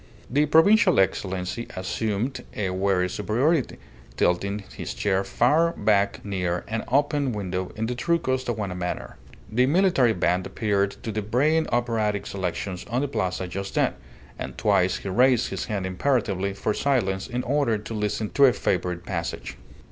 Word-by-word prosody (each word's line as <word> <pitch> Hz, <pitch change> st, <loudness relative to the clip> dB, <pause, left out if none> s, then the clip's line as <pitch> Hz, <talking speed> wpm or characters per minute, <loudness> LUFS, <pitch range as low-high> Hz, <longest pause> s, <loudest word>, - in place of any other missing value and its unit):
The 145 Hz, +3 st, +3 dB
provincial 180 Hz, -, +5 dB
Excellency 95 Hz, +3 st, -1 dB
assumed 110 Hz, +6 st, -2 dB
a 100 Hz, -3 st, -1 dB
weary 95 Hz, -1 st, +1 dB
superiority, 120 Hz, -, 0 dB, 0.4 s
tilting 100 Hz, +3 st, +1 dB
his -, -, -5 dB
chair 95 Hz, -1 st, +1 dB
far 150 Hz, +12 st, +2 dB
back 100 Hz, -4 st, +1 dB
near 90 Hz, -3 st, -2 dB
an 115 Hz, +1 st, -2 dB
open 140 Hz, 0 st, +1 dB
window 95 Hz, -3 st, -3 dB
in 110 Hz, -, -2 dB
the 120 Hz, -, -2 dB
true 145 Hz, +8 st, +1 dB
Costaguana 120 Hz, -, -2 dB
manner. 90 Hz, -1 st, -4 dB, 0.3 s
The 125 Hz, +4 st, +3 dB
military 155 Hz, -7 st, +3 dB
band 90 Hz, 0 st, 0 dB
happened 100 Hz, -2 st, 0 dB
to 110 Hz, -, -3 dB
be 110 Hz, +1 st, -2 dB
braying 145 Hz, +10 st, +2 dB
operatic 110 Hz, -4 st, 0 dB
selections 95 Hz, 0 st, -4 dB
on 120 Hz, +3 st, 0 dB
the 145 Hz, -, 0 dB
plaza 95 Hz, -7 st, -2 dB
just 95 Hz, +2 st, -5 dB
then, -, -, +2 dB, 0.5 s
and -, -, -6 dB
twice 90 Hz, 0 st, +2 dB
he 100 Hz, -, -6 dB
raised 125 Hz, +4 st, +3 dB
his -, -, -3 dB
hand 100 Hz, -4 st, -3 dB
imperatively 100 Hz, -1 st, 0 dB
for 105 Hz, +2 st, -1 dB
silence 100 Hz, -10 st, 0 dB
in 125 Hz, 0 st, -3 dB
order 135 Hz, -4 st, +1 dB
to 105 Hz, +2 st, -8 dB
listen 105 Hz, 0 st, -2 dB
to 140 Hz, -, +5 dB
a 125 Hz, -, +5 dB
favourite 90 Hz, -1 st, -1 dB
passage. 75 Hz, -8 st, -4 dB
105 Hz, 155 wpm, -25 LUFS, 95-125 Hz, 0.5 s, provincial